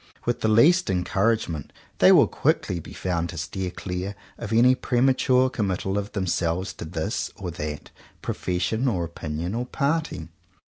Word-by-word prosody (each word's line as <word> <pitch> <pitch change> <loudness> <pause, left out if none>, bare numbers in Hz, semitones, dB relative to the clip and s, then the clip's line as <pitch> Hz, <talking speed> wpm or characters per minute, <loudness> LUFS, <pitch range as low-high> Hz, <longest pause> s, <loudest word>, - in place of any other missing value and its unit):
With 120 - -1
the - - +2
least 150 +12 +5
encouragement 95 - 0 0.3
they - - +7
will - - +7
quickly 90 - 0
be - - -11
found 85 -2 -2
to 85 - -7
steer 90 +4 -3
clear 90 +2 -5 0.2
of 115 -2 -7
any 120 +3 +6
premature 130 0 +3
committal 95 -5 -2
of 100 0 -3
themselves 90 -1 -1
to - - -8
this 80 0 -2
or 90 -3 -5
that 75 -2 -6 0.3
profession 90 +8 -1
or 95 -8 0
opinion 85 +1 -4
or 120 +2 -2
party. 140 - -1
95 Hz, 150 wpm, -25 LUFS, 85-120 Hz, 0.3 s, they